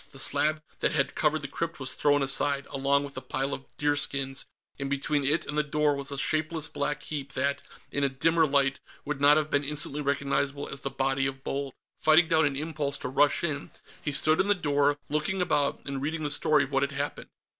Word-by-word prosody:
The - - -12
slab 150 +3 +1 0.2
that - - +1
had 140 -3 +1
covered 155 -1 +1
the - - -3
crypt 165 +4 -4
was 130 -1 -2
thrown 145 -1 +2
aside, 140 +1 +3
along 140 +1 +1
with 140 -1 -8
the 130 - -6
pile 135 +1 -2
of 135 - -6
deerskins, 140 -2 0 0.3
and 140 0 -3
between 140 +1 0
it 150 +4 +2
and 150 - -5
the 150 - +3
door 150 0 +1
was 140 0 -3
a 140 - -4
shapeless 155 +2 0
black 150 -1 -3
heap 140 -3 -5
that, 140 +2 -1 0.3
in 140 - -1
a 140 - +3
dimmer 160 +5 +2
light, 140 -1 +2 0.3
would 145 -1 -3
not 145 +1 +6
have 155 -1 -1
been 145 0 +2
instantly 150 0 0
recognizable 140 0 -1
as 140 - -7
the 135 - -3
body 135 0 0
of 135 0 -6
Bold. 140 -1 -4 0.2
Fighting 160 +2 +5
down 160 -2 +3
an 140 - -3
impulse 145 -1 -3
to - - -5
rush 145 +4 +3
in, 150 -4 -2 0.3
he 150 - -2
stood 155 +4 +4
in 190 - -1
the 205 - +4
door, 145 -4 +1
looking 150 +6 -1
about 150 -5 +1
and 140 -1 -4
reading 155 +2 -2
the 145 - -1
story 150 0 +3
of 135 - -7
what 135 -1 +2
had 140 0 -1
happened. 140 +1 -4
145 Hz, 220 wpm, -28 LUFS, 140-150 Hz, 0.3 s, not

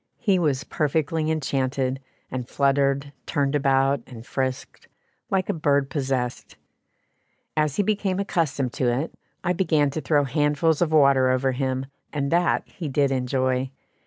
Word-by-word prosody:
He 195 -5 +2
was 145 -6 +1
perfectly 155 +1 0
enchanted, 135 -3 -1 0.3
and 125 -1 -4
fluttered, 140 0 +1
turned 140 -1 0
about, 135 -1 +2
and 115 -2 -11
frisked, 130 -1 -4 0.4
like 190 -1 +1
a - - 0
bird 140 -3 +1
possessed. 130 -4 -2 1.0
As 150 -2 +1
he 205 - +2
became 200 -2 0
accustomed 150 -10 -1
to 125 -2 +1
it, 135 +7 -2 0.3
I 180 - +1
began 155 -6 +2
to 155 - -3
throw 150 -2 +2
handfuls 150 +3 +1
of 165 -3 +2
water 140 -4 +5
over 130 +1 +2
him, 130 0 -2 0.3
and 140 -2 -2
that 175 +1 +2
he 175 -6 -6
did 140 0 +2
enjoy. 130 0 0
140 Hz, 145 wpm, -24 LUFS, 130-155 Hz, 1.0 s, water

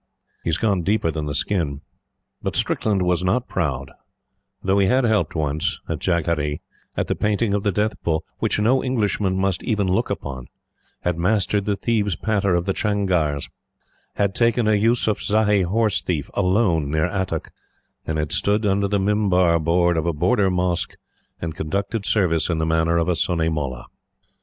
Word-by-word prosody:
He - - -7
has 80 - +1
gone 100 -5 +1
deeper 95 -2 +1
than 75 -1 -4
the 70 - -3
skin. 75 -4 -1 0.6
But - - -3
Strickland 100 -4 0
was 90 0 +1
not 110 +7 +1
proud, 70 -6 -2 0.7
though 95 +1 +2
he 95 - +3
had 130 +6 +3
helped 110 -6 +1
once, 75 -1 -1
at - - -3
Jagadhri, 80 -4 0 0.4
at - - +1
the - - -1
Painting 105 0 0
of 100 - +1
the 105 - +1
Death 105 +3 0
Bull, 80 -2 0 0.2
which - - +1
no 120 +5 +3
Englishman 105 -6 0
must 95 -2 0
even 105 -4 0
look 95 0 0
upon; 65 -3 -5 0.5
had 90 -1 -1
mastered 100 +2 +1
the 105 - +1
thieves' 105 -4 0
patter 100 -1 +1
of 85 0 0
the 95 - 0
changars; 90 -10 0 0.7
had 100 -1 +1
taken 115 0 +2
a - - +4
Eusufzai 105 -1 +2
horse 105 -3 +1
thief 65 - -3
alone 90 -6 +2
near 80 +1 +1
Attock; 95 -2 -3 0.5
and 80 - -3
had 75 -1 -2
stood 105 +2 +1
under 100 0 +2
the 100 +1 +1
mimbar 95 -4 +2
board 85 +1 +2
of 80 +1 0
a 85 - +1
Border 100 +6 +2
mosque 90 -1 -1 0.4
and 80 -1 -4
conducted 100 +6 -2
service 90 -7 +2
in 85 - 0
the 80 - 0
manner 80 +1 +2
of 85 0 +1
a 90 - +2
Sunni 85 -1 +1
Mollah. 70 -6 -3
95 Hz, 175 wpm, -22 LUFS, 80-105 Hz, 0.7 s, a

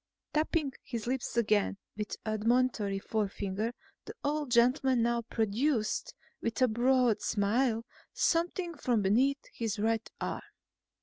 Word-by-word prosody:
Tapping 305 -2 +1
his 235 -4 -5
lips 250 -1 -2
again 210 -3 +2 0.2
with 210 0 -4
admonitory 215 -1 +1
forefinger, 205 +1 -2 0.3
the 435 - -8
old 295 -1 -1
gentleman 250 +1 +4
now 235 0 +1
produced, 225 +2 0 0.3
with 230 - -2
a 255 - +5
broad 245 0 +3
smile, 225 +3 +1 0.3
something 345 +1 0
from 240 -7 +1
beneath 260 +8 +2
his 225 -2 -2
right 225 +2 0
arm. - - -3
235 Hz, 120 wpm, -31 LUFS, 215-265 Hz, 0.3 s, a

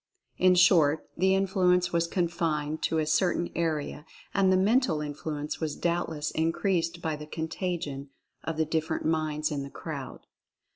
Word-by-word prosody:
In 185 0 +5
short, 165 -4 +4
the 190 +2 +3
influence 180 -2 +2
was 170 0 +2
confined 165 -4 -1
to 160 - 0
a 155 - +1
certain 170 +2 +1
area 155 -3 -2 0.3
and 195 -2 +3
the 185 - +4
mental 210 - +3
influence 150 0 -4
was 155 -3 -2
doubtless 165 -3 -1
increased 170 +1 0
by 160 -1 -1
the 150 0 -9
"contagion" 160 -4 -4 0.3
of 160 -1 -3
the 160 - +2
different 160 0 -2
minds 155 -1 0
in 145 -2 -2
the 140 - -6
crowd. 140 -4 -7
160 Hz, 150 wpm, -28 LUFS, 150-180 Hz, 0.3 s, In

